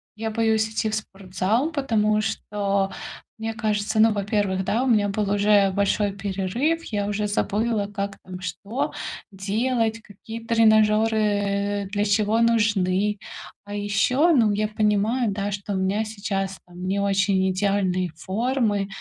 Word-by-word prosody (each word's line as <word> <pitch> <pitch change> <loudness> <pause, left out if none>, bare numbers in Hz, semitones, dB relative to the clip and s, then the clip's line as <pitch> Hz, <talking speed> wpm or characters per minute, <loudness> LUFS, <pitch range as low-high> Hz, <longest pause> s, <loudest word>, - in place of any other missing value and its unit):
я 220 +1 -3
боюсь 220 -1 +1
идти 220 0 -1
в 215 - -1
спортзал, 200 - -2
потому 215 -8 +1
что, 200 -2 -1 0.5
мне 225 0 -3
кажется, 215 -1 -1
ну, 225 +1 +6
во-первых, 200 -2 0
да, 230 +6 +1
у - - 0
меня 210 -4 +3
был 200 0 -1
уже 205 -1 +4
большой 200 +1 +1
перерыв, 200 - -1
я 205 -2 -2
уже 210 0 -1
забыла, 210 +1 0
как 200 -1 -4
там 185 0 -9
что 200 +7 -3 0.4
делать, 225 +3 -1
какие 215 +2 -9
тренажёры, 220 -1 +4
э, 205 -1 0
для 205 0 0
чего 210 +2 +2
нужны. 210 -3 +2 0.5
А 205 - -8
ещё, 205 - +2
ну, 225 -5 +4
я 210 +1 0
понимаю, 215 +2 +1
да, 200 +1 -2
что 200 0 -4
у - - -1
меня 190 +3 0
сейчас 195 -2 -3
там 180 +1 -9
не 195 +2 0
очень 195 -1 +2
идеальные 185 -1 0
формы. 210 +2 -1
205 Hz, 145 wpm, -24 LUFS, 195-220 Hz, 0.5 s, ну